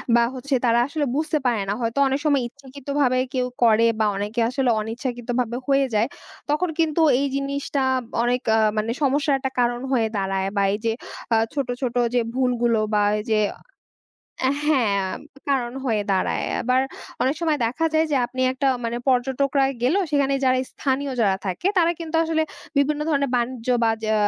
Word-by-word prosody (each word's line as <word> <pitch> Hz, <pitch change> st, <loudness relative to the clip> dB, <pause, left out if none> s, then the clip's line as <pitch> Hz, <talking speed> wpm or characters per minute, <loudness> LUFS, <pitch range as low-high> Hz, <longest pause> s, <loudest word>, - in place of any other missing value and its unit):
বা 235 Hz, -, +5 dB
হচ্ছে 270 Hz, +2 st, -4 dB
তারা 235 Hz, 0 st, +4 dB
আসলে 290 Hz, 0 st, -1 dB
বুঝতে 310 Hz, +1 st, 0 dB
পারে 235 Hz, -4 st, +2 dB
না। -, -, +1 dB
হয়তো 230 Hz, +2 st, -2 dB
অনেক 270 Hz, +2 st, 0 dB
সময় 285 Hz, -3 st, +3 dB
ইচ্ছাকৃতভাবে 275 Hz, 0 st, -2 dB, 0.2 s
কেউ 250 Hz, -1 st, 0 dB, 0.2 s
করে 230 Hz, 0 st, +5 dB
বা 220 Hz, -, +3 dB
অনেকে 210 Hz, +4 st, -3 dB
আসলে 255 Hz, 0 st, 0 dB
অনিচ্ছাকৃতভাবে 240 Hz, +1 st, -3 dB
হয়ে 275 Hz, 0 st, +3 dB
যায়। 215 Hz, +2 st, +3 dB, 0.4 s
তখন 315 Hz, +4 st, +1 dB
কিন্তু 325 Hz, 0 st, +2 dB, 0.2 s
এই 280 Hz, -, +1 dB
জিনিসটা 280 Hz, 0 st, -2 dB, 0.4 s
অনেক 245 Hz, +1 st, +1 dB
আ -, -, +3 dB, 0.2 s
মানে 215 Hz, +2 st, 0 dB
সমস্যার 280 Hz, +1 st, +2 dB
একটা 265 Hz, 0 st, -3 dB
কারণ 240 Hz, 0 st, +1 dB
হয়ে 235 Hz, -4 st, +2 dB
দাঁড়ায়। 195 Hz, 0 st, -1 dB
বা 200 Hz, -, +2 dB
এই -, -, -1 dB
যে 225 Hz, -, +2 dB, 0.4 s
আ -, -, +5 dB, 0.2 s
ছোট, 280 Hz, -3 st, -1 dB
ছোট 250 Hz, -2 st, -2 dB, 0.2 s
যে 245 Hz, -, +4 dB, 0.2 s
ভুলগুলো 240 Hz, -3 st, +1 dB
বা 210 Hz, -, +3 dB, 0.2 s
এই -, -, -5 dB
যে 215 Hz, -, +3 dB, 1.0 s
অ্যা 260 Hz, -, +3 dB, 0.2 s
হ্যাঁ, 235 Hz, -10 st, +2 dB, 0.5 s
কারণ 250 Hz, -4 st, 0 dB
হয়ে 220 Hz, -5 st, +1 dB
দাঁড়ায়। 190 Hz, -, 0 dB, 0.2 s
আবার 255 Hz, +2 st, +2 dB, 0.4 s
অনেক 265 Hz, +2 st, +2 dB
সময় 315 Hz, -3 st, +1 dB
দেখা 265 Hz, +8 st, -2 dB
যায় 315 Hz, +1 st, +3 dB
যে 285 Hz, -, +2 dB
আপনি 255 Hz, +1 st, -6 dB
একটা 265 Hz, +1 st, 0 dB, 0.2 s
মানে 230 Hz, +1 st, -2 dB
পর্যটকরা 265 Hz, +2 st, +2 dB, 0.2 s
গেল। 255 Hz, +7 st, +3 dB, 0.2 s
সেখানে 280 Hz, -2 st, +2 dB
যারা 255 Hz, 0 st, +3 dB
স্থানীয় 275 Hz, 0 st, -1 dB
যারা 195 Hz, -4 st, +3 dB
থাকে 185 Hz, -, -3 dB
তারা, 340 Hz, -1 st, +4 dB
কিন্তু 325 Hz, -1 st, -3 dB
আসলে 320 Hz, -1 st, +1 dB, 0.3 s
বিভিন্ন 290 Hz, +1 st, +2 dB
ধরনের 280 Hz, -3 st, +1 dB
বাণিজ্য 240 Hz, 0 st, -3 dB, 0.2 s
বা 225 Hz, -, +4 dB
যা 220 Hz, -, +1 dB
255 Hz, 175 wpm, -23 LUFS, 235-280 Hz, 1.0 s, বা